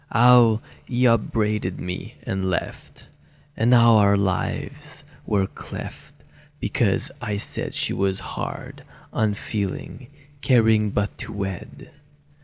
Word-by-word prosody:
How 120 -2 +6 0.2
he 125 0 0
upbraided 105 -4 +1
me, 90 0 -6
and 95 -1 -2
left, 90 - -5 0.5
And 115 +2 +2
our 110 -4 +6
lives 95 -2 -3 0.2
were 100 -2 +2
cleft, - - -9 0.4
because - - 0
I 105 -1 -2
said 100 - -3
She - - +2
was 95 0 0
hard, - - -6 0.3
unfeeling, 105 +2 -3 0.3
caring 110 -5 +4
but 100 0 -1
to - - -7
wed. 95 -3 -6
105 Hz, 105 wpm, -23 LUFS, 100-115 Hz, 0.5 s, How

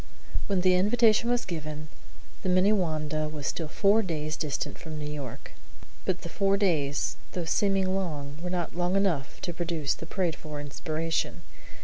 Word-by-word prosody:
When 195 -3 +2
the 185 0 +5
invitation 220 +4 +4
was 245 0 +2
given, 155 -3 -5 0.5
the 185 - -1
Minnewanda 160 -6 +2
was 150 -2 -5
still 160 +1 -1
four 200 +7 +4
days 155 -5 -2
distant 150 -3 -2
from 160 -2 -6
New 150 - -4
York; 145 -5 -6 0.5
but 185 -1 0
the - - -5
four 195 +3 +2
days, 155 -8 +1 0.2
though 175 -2 -2
seeming 190 +2 +2
long, 150 -6 -3
were 180 - -3
not 175 -2 -1
long 175 +2 +1
enough 180 -9 +1
to 175 - -3
produce 165 -4 0
the 165 - -8
prayed 175 -3 0
for 150 -1 -7
inspiration. 155 +2 -2
170 Hz, 160 wpm, -29 LUFS, 155-190 Hz, 0.5 s, the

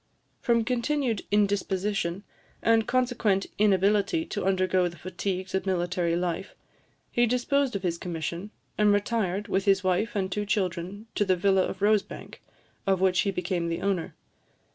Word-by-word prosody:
From 235 -1 +2
continued 250 -2 0
indisposition, 200 -2 0 0.4
and 225 -1 +3
consequent 240 -6 +1
inability 205 - +3
to 205 - -4
undergo 185 -1 +2
the 170 0 -8
fatigues 185 +2 -4
of 190 +1 -1
military 175 -2 0
life, 175 +2 -3 0.6
he 240 0 +3
disposed 250 +2 +1
of 200 - -3
his 170 -2 -1
commission, 170 +3 -4 0.3
and 210 -1 +5
retired, 205 -1 0
with 195 +2 0
his 195 -1 +3
wife 185 +5 0
and 190 -2 -1
two 205 +1 -2
children, 190 +1 -2
to - - +1
the 190 -2 +2
villa 190 +1 +3
of - - -6
Rosebank, 210 -1 0 0.5
of 190 -1 +3
which 185 -1 +3
he 200 - +2
became 180 -2 -2
the 165 - -3
owner. 195 -4 -1
195 Hz, 150 wpm, -27 LUFS, 180-210 Hz, 0.6 s, and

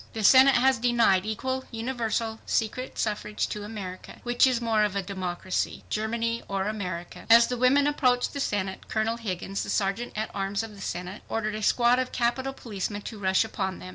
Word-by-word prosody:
THE 220 - -3
SENATE 260 +5 +7
HAS 260 0 +4
DENIED 230 -5 +3
EQUAL, 260 +4 -2
UNIVERSAL, 225 -1 -2
SECRET 240 +4 -1
SUFFRAGE 210 -1 -1
TO 210 - -5
AMERICA. 200 -4 -8
WHICH 240 +2 +4
IS 255 -2 +1
MORE 225 -2 +2
OF 205 -2 0
A 200 - -1
DEMOCRACY, 185 -1 -3
GERMANY 230 +2 -1
OR 195 -1 -1
AMERICA? 185 -5 -5
As 230 +1 +8
the 250 - -2
women 265 +3 +4
approached 255 -4 +2
the 280 - -4
Senate, 195 -7 -2
Colonel 225 +1 0
Higgins, 195 -3 -4
the - - -5
Sergeant 205 +4 -1
at 215 +1 -3
Arms 195 +2 -1
of 225 -1 -8
the 200 - -12
Senate, 180 +2 -5
ordered 215 -1 -1
a 215 - -4
squad 240 +3 +4
of 255 0 -2
Capitol 255 +2 0
policemen 205 -5 -5
to 220 - -7
rush 190 0 +3
upon 190 -3 -3
them. 185 - -9
220 Hz, 190 wpm, -27 LUFS, 195-240 Hz, -, As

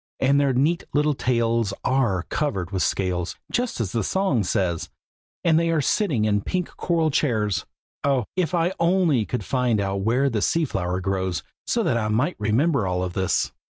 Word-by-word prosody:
and 140 +2 +3
their 140 -1 +3
neat 145 +7 +1
little 150 +1 +3
tails 115 -5 0
are 120 -9 +1
covered 100 - -2
with 95 -2 -1
scales, 90 -2 -1 0.2
just 245 - -1
as 105 -6 -1
the 115 -2 -1
song 190 - +1
says, 90 -2 -1 0.5
and 165 -2 +4
they 165 0 +1
are 165 -1 +2
sitting 145 - +1
in 105 -1 +2
pink 180 - -3
coral 165 -3 +1
chairs. 105 - 0 0.4
Oh! 135 -5 +2
if 185 -1 0
I 170 0 +2
could 190 - -9
only 170 - +3
find 125 -2 0
out 100 0 -1
where 120 +7 +2
the 115 -6 -1
sea 165 +8 +2
flower 90 -7 -2
grows, 95 -2 -1 0.2
so - - +1
that - - +1
I 110 -2 0
might 125 +11 +1
remember 115 - +1
all 90 0 -1
this!" 95 +1 0
120 Hz, 180 wpm, -24 LUFS, 100-155 Hz, 0.5 s, and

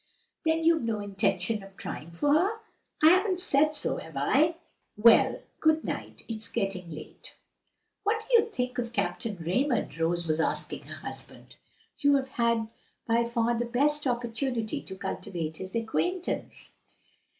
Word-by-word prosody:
"Then 325 0 +2
you've 325 -1 +4
no 225 -2 -1
intention 205 +1 0
of 195 0 -14
trying 155 - -6
for 285 +13 +1
her?" 385 +8 +3 0.5
"I 315 - +10
haven't 375 0 +3
said 305 -3 +3
so, 295 - -1
have 160 -3 -8
I? 295 - +3 0.4
Well, 225 +2 +6 0.2
good 315 0 +3
night, - - -5
it's 220 -1 -4
getting 195 -5 -2
late." 155 -1 -10 0.7
"What 440 +2 0
do - - -5
you 455 - -6
think 250 - -2
of 240 -1 -3
Captain 230 -2 -1
Raymond?" 230 - 0
Rose 170 +1 0
was 155 0 +1
asking 160 - -1
her - - -8
husband. - - -9 0.4
"You 285 -1 +5
have 270 -1 0
had 235 -3 +1 0.4
by 235 0 +3
far 235 0 +1
the - - +1
best 290 +4 +1
opportunity 240 -1 -1
to 190 - -9
cultivate 170 -4 -4
his 190 +2 -7
acquaintance." 350 +11 -2
235 Hz, 150 wpm, -28 LUFS, 195-295 Hz, 0.7 s, I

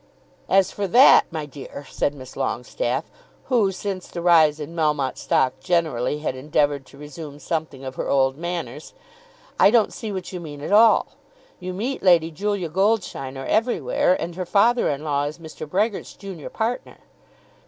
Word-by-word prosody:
"As 195 -1 +4
for 200 -1 -3
that, 250 +9 +7
my 160 -3 -4
dear," 145 0 -10
said 145 - -1
Miss 130 -2 -11
Longestaffe, - - -2 0.4
who, 225 -7 +3
since 190 0 -5
the 175 - -7
rise 160 -3 +5
in 155 +3 -7
Melmotte 150 -5 0
stock 130 -1 +1
generally, 160 -7 0
had 140 - -2
endeavoured 145 0 0
to 140 - -16
resume 150 0 -9
something 155 -4 -4
of 130 - -5
her - - -3
old 135 -1 +2
manners, 160 -4 -6 0.6
"I - - +7
don't 225 -1 +3
see 220 -2 -5
what 190 -1 -6
you 180 - -4
mean 150 -4 -9
at 150 - -5
all. 220 +1 +6 0.5
You 185 0 -5
meet 235 +9 -3
Lady 170 -3 +4
Julia 200 +2 -2
Goldsheiner 160 -8 -1
everywhere, 185 - +1
and 170 - -4
her 185 0 -4
father 235 +5 +3
in 145 +1 -3
law 145 -2 0
is 145 +1 -5
Mr. 160 -2 -9
Brehgert's 205 +4 -1
junior 190 -6 -8
partner." 230 +2 -3
165 Hz, 165 wpm, -23 LUFS, 145-195 Hz, 0.6 s, that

